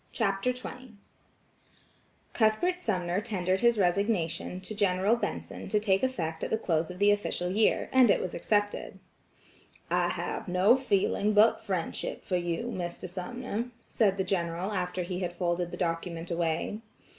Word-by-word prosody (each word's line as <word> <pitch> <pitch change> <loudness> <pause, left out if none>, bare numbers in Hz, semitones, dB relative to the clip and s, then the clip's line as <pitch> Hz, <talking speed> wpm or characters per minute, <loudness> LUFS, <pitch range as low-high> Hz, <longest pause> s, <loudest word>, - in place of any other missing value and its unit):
CHAPTER 200 +1 +1
XX 250 -1 -9 1.4
Cuthbert 245 +12 +2
Sumner 185 - -1
tendered 190 -4 -1
his 235 -1 +4
resignation 180 -2 0
to 205 - -5
General 200 +1 +2
Benson 240 - -5
to 210 - +2
take 195 -2 +2
effect 165 -12 -2
at - - -2
the 220 - +1
close 165 -6 0
of 180 - -7
the 205 +2 +5
official 190 -3 -1
year, 215 +3 +2
and 255 -3 +6
it - - +4
was 185 - -4
accepted. 205 +3 -1 0.9
"I - - +2
have - - -3
no 185 +6 +5
feeling 210 -4 +1
but 210 +2 +5
friendship 185 -4 -3
for 180 - 0
you, 175 +8 -2
Mr. 175 0 -4
Sumner," 230 +5 -4 0.2
said 200 -4 +2
the 190 - +1
General 175 +1 -1
after 180 -2 -2
he 180 +1 -4
had 175 -2 -3
folded 175 0 -1
the - - -7
document 170 0 -3
away. 170 +4 -1
190 Hz, 155 wpm, -29 LUFS, 175-215 Hz, 1.4 s, and